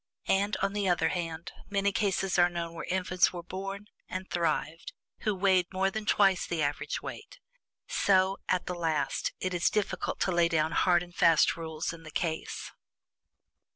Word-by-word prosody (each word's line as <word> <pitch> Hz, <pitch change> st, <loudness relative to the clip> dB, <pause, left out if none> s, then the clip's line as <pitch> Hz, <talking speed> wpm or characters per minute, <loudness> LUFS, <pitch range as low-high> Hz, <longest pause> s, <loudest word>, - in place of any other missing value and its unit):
And, 200 Hz, +2 st, +1 dB
on 195 Hz, 0 st, +1 dB
the 205 Hz, -2 st, 0 dB
other 160 Hz, -2 st, +2 dB
hand, 165 Hz, -1 st, -4 dB, 0.2 s
many 200 Hz, 0 st, +1 dB
cases 195 Hz, -2 st, 0 dB
are 175 Hz, 0 st, +6 dB
known 170 Hz, -1 st, -4 dB
where 165 Hz, -, -6 dB
infants 180 Hz, -1 st, +2 dB
were 175 Hz, -1 st, -7 dB
born, 195 Hz, +3 st, -6 dB, 0.2 s
and 185 Hz, 0 st, -5 dB
thrived, 165 Hz, -1 st, -2 dB, 0.3 s
who 210 Hz, -2 st, 0 dB
weighed 185 Hz, -2 st, +2 dB
more 190 Hz, +1 st, +1 dB
than 215 Hz, +1 st, -5 dB
twice 195 Hz, -3 st, +3 dB
the 165 Hz, -2 st, -1 dB
average 145 Hz, +1 st, -2 dB
weight. -, -, -8 dB, 0.5 s
So, 190 Hz, 0 st, +2 dB
at 185 Hz, -, +1 dB
the 180 Hz, -, -3 dB
last, 160 Hz, -4 st, -1 dB
it 185 Hz, 0 st, -2 dB
is 175 Hz, 0 st, +2 dB
difficult 210 Hz, -2 st, -2 dB
to 190 Hz, -, +2 dB
lay 170 Hz, -1 st, +4 dB
down 160 Hz, -1 st, +1 dB
hard 175 Hz, -1 st, +3 dB
and 175 Hz, 0 st, -13 dB
fast 165 Hz, -2 st, +4 dB
rules 160 Hz, 0 st, -4 dB
in 165 Hz, -, -11 dB
the 160 Hz, -, -10 dB
case. 160 Hz, 0 st, -3 dB
180 Hz, 175 wpm, -29 LUFS, 165-195 Hz, 0.5 s, are